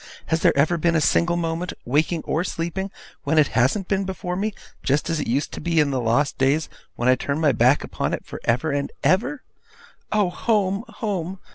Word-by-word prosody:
'Has 160 - +2
there - - +3
ever 160 +5 +3
been 170 +1 +2
a - - +4
single 170 +3 +2
minute, 170 +1 -2
waking 155 +5 +1
or 160 - 0
sleeping, 185 +2 -3 0.3
when 160 - 0
it 150 -2 +5
hasn't 130 - +1
been 195 -1 +1
before 185 -1 -4
me, 210 +4 -1 0.3
just 145 +5 0
as 165 - 0
it - - -3
used 135 +6 0
to - - -7
be 170 -1 +1
in 145 -2 +3
the 130 -2 0
lost 120 +5 +1
days 140 +4 +2 0.3
when 120 - -1
I 130 - +7
turned 140 +4 -2
my 155 -3 +4
back 125 +4 +3
upon - - -3
it - - -4
for - - -8
ever 125 +7 +1
and 140 0 -1
for - - -3
ever! 250 +9 +1 0.7
Oh, 205 -4 +2
home, 205 0 0
home! 195 -5 -3
165 Hz, 215 wpm, -23 LUFS, 140-185 Hz, 0.7 s, I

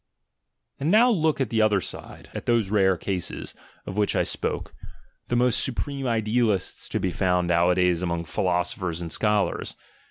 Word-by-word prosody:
And 145 - -1
now 230 +6 +5
look 160 -8 +1
at 130 -6 -1
the 110 -1 +2
other 105 -2 +3
side, 90 - -9
at - - -7
those 115 -5 +2
rare 95 -3 +3
cases, 90 0 -4 0.3
of 95 - -6
which 105 -1 +1
I - - +3
spoke, - - -3 0.5
the 120 - -1
most 125 -1 +3
supreme 135 +1 -2
idealists 110 -3 0
to - - -1
be 95 - -1
found 90 0 +1
nowadays 90 0 +2
among 85 -2 -2
philosophers 90 -1 -1
and 85 -2 -5
scholars. 105 0 0
100 Hz, 160 wpm, -25 LUFS, 90-120 Hz, 0.5 s, now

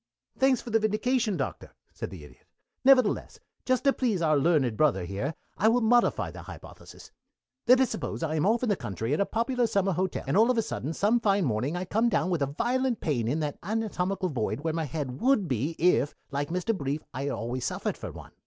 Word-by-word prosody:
"Thanks 265 -1 +3
for 235 - -8
the 225 - +4
vindication, 215 0 0
Doctor," 135 - -5 0.2
said - - -5
the 90 -6 -10
Idiot. 75 - -17 0.4
"Nevertheless, 255 -5 +3 0.3
just 255 -1 +1
to 275 -1 +4
please 230 -8 0
our 155 -2 +2
learned 140 -6 +2
brother 115 -9 +2
here, 100 - -3 0.2
I 215 - +4
will 240 +2 +4
modify 240 +2 +2
the - - -9
hypothesis. - - -12 0.6
"Let 255 +2 +7
us 260 -3 +2
suppose - - -4
that 165 -2 -1
I - - -1
am 155 - +2
off 230 +3 +2
in 245 - +1
the 205 - +3
country 115 - -3
at - - 0
a 200 - +2
popular 240 +1 0
summer 195 -2 +1
hotel, 185 +1 -2
and - - -1
all 225 +4 +5
of 250 - +2
a 225 - +2
sudden 160 -7 -4
some 220 +4 +2
fine 200 -4 +2
morning 125 +6 -1
I 180 +1 -3
come 220 +6 +1
down 185 -4 0
with 170 -4 0
a 140 - +2
violent 245 - 0
pain 120 -8 -1
in 150 +7 0
that 150 -2 -3
anatomical 195 -2 -2
void 130 -1 -2
where 160 0 -1
my 165 -1 -1
head 140 -3 -5
would 245 -7 +3
be 140 +5 -1
if, 165 -4 +2 0.2
like 145 +1 -2
Mr. 185 +6 -1
Brief, 145 -2 -3
I 135 +3 -3
always 120 +1 -3
suffered - - -2
from - - -8
one. - - -11
180 Hz, 225 wpm, -28 LUFS, 145-225 Hz, 0.6 s, Let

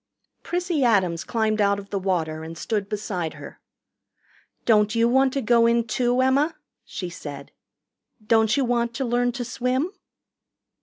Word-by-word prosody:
Prissy 350 -4 -1
Adams 185 -8 +2
climbed 220 -2 0
out 200 0 +3
of 200 0 -10
the 200 - -1
water 160 -5 -1
and 165 +1 -8
stood 205 +1 -2
beside 190 -6 -3
her. - - -11 1.1
"Don't 210 -1 +3
you 230 0 +3
want 265 +2 +3
to 275 - -1
go 230 +1 +4
in, 235 0 +2
too, 245 +2 0
Emma?" 280 +5 +2 0.3
she 180 - -6
said. 145 -5 -8 0.7
"Don't 220 +2 +3
you 275 - +2
want 235 -1 0
to 265 - -2
learn 245 +1 +1
to 245 0 -4
swim?" 255 +7 -1
230 Hz, 155 wpm, -24 LUFS, 200-250 Hz, 1.1 s, go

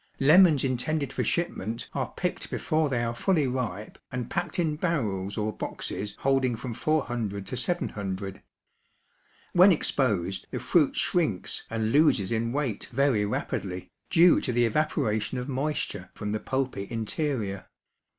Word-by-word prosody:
Lemons 155 +1 +6
intended 140 +3 -1
for - - -1
shipment 115 - -2
are - - -2
picked - - -2
before 155 -1 0
they 120 -3 0
are 115 0 -1
fully 155 +4 +2
ripe 125 -5 -3
and 125 -2 -4
packed 175 0 -2
in 160 -4 +1
barrels 110 - -1
or 105 0 -1
boxes 100 +2 -4
holding 135 -3 +2
from 120 +1 -5
400 120 -8 -1
to 100 - -5
700. 100 - -2 1.1
When 185 +3 +8
exposed 100 - 0
the - - -4
fruit 135 +5 +2
shrinks 155 - 0
and 110 -1 -1
loses 140 -9 +4
in 115 0 0
weight 135 -6 -2
very 125 -5 +2
rapidly, 90 -3 -3 0.2
due 175 +1 +6
to 125 - -1
the 120 0 +3
evaporation 125 -3 0
of 125 +1 -4
moisture 135 -9 -2
from 105 -1 -4
the 110 - -1
pulpy 130 -5 -2
interior. 115 -3 -3
125 Hz, 140 wpm, -27 LUFS, 105-150 Hz, 1.1 s, When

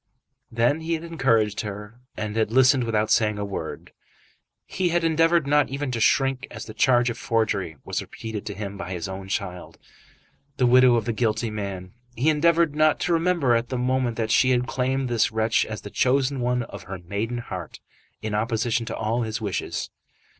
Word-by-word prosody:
Then 120 +6 +2
he 165 +1 -1
had 160 - -6
encouraged 115 -11 +1
her, 105 +2 -8 0.2
and 105 0 -4
had 110 -1 +1
listened 130 0 +4
without 110 -2 0
saying 105 -2 +3
a 100 - -2
word. 95 -5 -6 0.7
He 185 -2 -1
had 170 0 +1
endeavoured 165 0 +3
not 145 0 +3
even 140 0 -3
to 120 - -2
shrink 135 +3 +2
as - - -8
the - - -9
charge 120 -2 +3
of - - -8
forgery 100 -8 -1
was - - -2
repeated 110 -2 -7
to 100 - -4
him 100 0 -6
by 90 +1 -5
his 85 -1 -4
own 95 0 -7
child, 90 -2 -4 0.8
the 125 - +3
widow 125 0 +6
of 115 - 0
the 115 - -1
guilty 115 0 0
man. 100 -3 -5 0.2
He 140 +7 +3
endeavoured 165 0 +3
not 155 0 +3
to 175 - +1
remember 165 -6 +2
at 115 +1 0
the 130 - -2
moment 125 -1 0
that 110 -1 -1
she 130 - +4
had 125 -1 +2
claimed 130 +2 -1
this 120 -3 +1
wretch 110 0 +1
as 110 -3 -6
the 105 - -9
chosen 135 +1 +1
one 125 0 0
of - - -9
her 95 0 -6
maiden 100 +7 -4
heart, 95 -8 -7 0.4
in 110 -1 -3
opposition 115 +1 0
to 115 - -3
all 110 +2 -1
his 110 -1 -3
wishes. 105 -5 -3
120 Hz, 195 wpm, -24 LUFS, 105-135 Hz, 0.8 s, widow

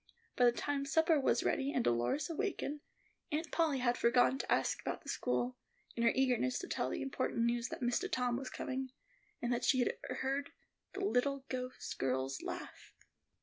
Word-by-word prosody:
By 250 - +5
the 240 - +7
time 280 +3 -2
supper 320 +1 +4
was 270 - +2
ready 275 +1 +1
and 250 - +1
Dolores 120 - +1
awakened, 330 -4 -2 0.5
Aunt 310 +1 -2
Polly 320 -5 +2
had 245 -1 +1
forgotten 250 +2 +4
to - - -4
ask - - +2
about - - -4
the - - -9
school, 250 0 -1 0.4
in 235 - -2
her 230 0 +5
eagerness 255 -1 +2
to 370 - -5
tell - - -1
the - - -2
important 260 -3 -1
news 235 0 +1
that - - -6
Mistah 245 +11 +1
Tom 250 -5 +1
was 255 +1 -4
coming, 260 0 -3 0.5
and 240 0 +1
that 240 - -1
she 260 - +4
had 245 - +2
heard 275 +2 -1 0.4
the 390 0 -2
little 275 -4 +1
ghost 255 0 -4
girl's 130 +1 -1
laugh. - - -7
260 Hz, 185 wpm, -35 LUFS, 240-285 Hz, 0.5 s, the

